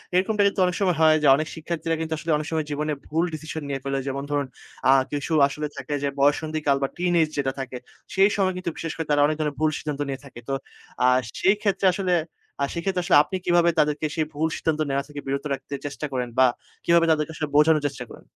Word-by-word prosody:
এরকমটা 205 +3 +2
কিন্তু 200 - -2
অনেক 180 0 -1
সময় 180 -4 +2
হয় 155 -1 +6
যে - - +5
অনেক 155 +2 -2
শিক্ষার্থীরা 165 0 -2
কিন্তু 160 0 -2
আসলে 165 +1 -3
অনেক 155 - -5
সময় 160 -1 0
জীবনে 150 +1 -1
ভুল 165 +3 0
ডিসিশন 155 +1 -5
নিয়ে 135 - -2
ফলে 135 0 -1
যেমন 140 +1 -3
ধরুন, 145 -1 0 0.4
অ্যা 135 - +7 0.2
কিছু 145 +3 -3 0.2
আসলে 150 +2 -4
থাকে 150 - -5
যে 140 - +1
বয়ঃসন্ধিকাল 150 0 +2
বা - - +2
টিনেজ 175 -3 +2
যেটা 135 -2 0
থাকে 130 -1 -5 0.4
সেই 195 +1 +5
সময় 190 -2 +1
কিন্তু 185 -2 -3
বিশেষ 165 - -4
করে 160 - -3
তারা 145 - +4
অনেক 155 +1 +1
ধরনের 150 -2 -1
ভুল 155 0 +3
সিদ্ধান্ত 145 -2 -4
নিয়ে 135 -1 -4
থাকে। 125 -3 -11
তো - - 0 0.5
অ্যা 125 - +4 0.3
সেই 195 +2 +4
ক্ষেত্রে 200 -2 0
আসলে 185 -2 0 0.6
সেক্ষেত্রে 180 +2 -1
আসলে 180 - +3
আপনি 185 - -6
কিভাবে 175 -1 +4
তাদেরকে 150 +1 +1
সেই 155 -2 +1
ভুল 160 +2 0
সিদ্ধান্ত 160 -1 -1
নেওয়া 135 0 0
থেকে 145 -1 -8
বিরত 140 +2 -2
রাখতে 135 +1 -7
চেষ্টা 145 +1 -4
করেন 125 -1 -2
বা 130 - +8 0.4
কিভাবে 170 0 +5
তাদেরকে 155 0 0
আসলে 150 -1 -2
বোঝানোর 150 0 +5
চেষ্টা 135 -3 -6
করেন? - - -13
155 Hz, 220 wpm, -24 LUFS, 145-170 Hz, 0.6 s, বা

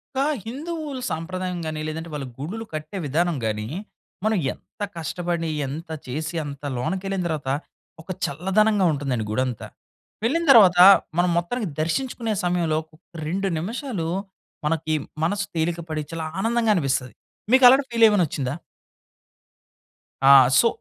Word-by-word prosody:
ఒక 265 - +1 0.2
హిందువులు 295 +2 -5
సాంప్రదాయం 180 +2 -3
గాని, 155 -1 -3
లేదంటే 160 +2 -5
వాళ్ళు 140 -3 -4
గుడులు 205 +11 -5
కట్టే 155 +5 -5
విధానం 165 +4 +1
గాని, 105 -1 -2 0.6
మనం 220 -1 +2 0.2
ఎంత - - -22 0.2
కష్టపడి 170 +1 -2 0.2
ఎంత 155 +6 -7 0.2
చేసి 155 +6 -4
అంత 140 0 -8
లోనకెళ్ళిన 190 +8 -2
దర్వాత 150 -5 -3 0.5
ఒక 160 - -21 0.2
చల్లదనంగా 195 +6 +2
ఉంటుందండి 135 -6 -2
గుడంతా. 125 +1 -2 0.6
వెళ్ళిన 305 +9 +1
దర్వాత 195 -8 +7 0.4
మనం 175 +1 +3
మొత్తానికి 210 +6 -1
దర్శించుకునే 230 +6 -1
సమయంలో, 175 -3 +1 0.5
2 195 +4 -1
నిమిషాలు 210 - -3 0.6
మనకి 155 0 0 0.3
మనసు 205 +5 0
తేలిక 165 +1 0
పడి 155 -1 -2
చాలా 160 -1 -3
ఆనందంగా 225 +1 +2
అనిపిస్తది. 135 - -1 0.4
మీకలాంటి 260 +1 +7
ఫీల్ 230 -1 +5
ఏమన్నా 205 -4 +3
ఒచ్చిందా? 135 -2 -3 1.7
ఆ! - - +8 0.3
సో, 235 - +5
175 Hz, 125 wpm, -23 LUFS, 155-215 Hz, 1.7 s, ఆ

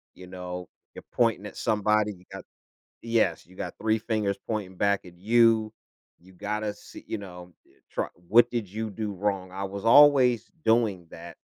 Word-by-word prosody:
you 90 -1 -12
know, 90 -1 -7 0.3
"You're - - -9
pointing 115 -4 +1
at - - -11
somebody, 105 0 +1
you 90 0 -19
got" - - -8 0.6
Yes, 115 -8 0
"you 95 +1 -19
got - - -6
3 110 0 +1
fingers 105 -3 -1
pointing 100 -4 -3
back 100 -2 +1
at 85 -1 -14
you. 110 +1 +3 0.5
You 95 +2 -19
gotta 105 +2 -3
see" - - -13
you 110 - -3
know, 90 -3 -11
eh, - - -28
"Try - - -2 0.2
what 120 +2 +6
did 115 -5 -2
you 110 +2 -4
do 105 0 -4
wrong?" 95 -1 -2
I 95 +1 -5
was 100 +2 -7
always 130 -2 +6 0.2
doing 110 -6 +2
that, 85 0 -11
105 Hz, 175 wpm, -27 LUFS, 95-110 Hz, 0.6 s, what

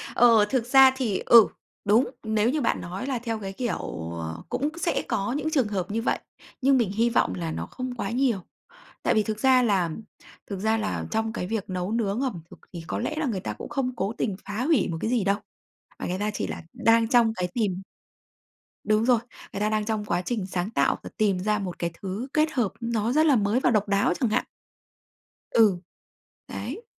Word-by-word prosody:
Ờ, 230 -3 +6
thực 250 -3 0
ra 265 +1 +7
thì, 230 -8 -1
ừ, 230 -3 +8 0.4
đúng, 220 +5 +4
nếu 220 +1 +1
như 300 +1 0
bạn 230 - 0
nói 185 +8 -5
là 255 -4 -1
theo 230 -2 -3
cái 195 -1 -6
kiểu, 85 - -4
ờ, 80 0 -6
cũng 290 +3 0
sẽ 340 - +1
có 200 +4 -1
những 295 +2 -1
trường 265 -8 +2
hợp 195 -2 -3
như 225 +1 -1
vậy. - - 0 0.4
Nhưng 270 0 +4
mình 220 -6 +1
hy 230 +3 +2
vọng 95 - +1
là 85 -3 -3
nó 80 +1 -4
không 255 - -6
quá 200 -3 -3
nhiều. 245 -4 +1 0.6
Tại - - +3
vì 215 - +3
thực 215 0 -3
ra 260 0 +5
là 190 -6 +2 0.6
thực 195 -2 -5
ra 220 +2 +1
là 215 -1 -2
trong 220 0 -1
cái 180 - -3
việc 220 -3 -3
nấu 185 +2 -3
nướng 225 +1 0
ẩm 235 -12 -2
thực - - -14
thì 170 -1 -6
có - - -2
lẽ 310 - -2
là 315 - 0
người 220 -7 -1
ta - - -4
cũng - - -9
không 255 -2 -2
cố 200 +1 -2
tình 200 -4 -1
phá 215 +4 -3
hủy 305 - +3
một 165 - -3
cái 220 - -1
gì 235 -5 +2
đâu. 200 +1 +2 0.6
Mà - - -3
người 185 +2 -2
ta 210 +1 -1
chỉ - - -2
là - - -6
đang 225 0 +3
trong 235 -2 +4
cái 180 -4 -2
tìm 195 -5 -1 1.0
Đúng 215 +1 +2
rồi. 245 -3 +4 0.3
Người - - -3
ta 210 +1 +1
đang 215 -1 0
trong 215 -2 -2
quá 180 - 0
trình 210 -1 -2
sáng 185 +1 -2
tạo - - +1
và - - -7
tìm 200 -4 +2
ra 210 +2 0
một 185 -3 -5
cái 170 -1 -1
thứ 200 +7 -4
kết 310 0 +2
hợp 240 -7 0
nó 230 -1 0
rất 310 +1 +4
là 285 -4 +5
mới 210 +3 +2
và 250 - +2
độc 210 -2 +2
đáo 200 -2 +2
chẳng 245 - +1
hạn. - - +1 1.1
Ừ, 210 -5 +4 0.7
đấy. 465 - -6
220 Hz, 225 wpm, -26 LUFS, 195-245 Hz, 1.1 s, ừ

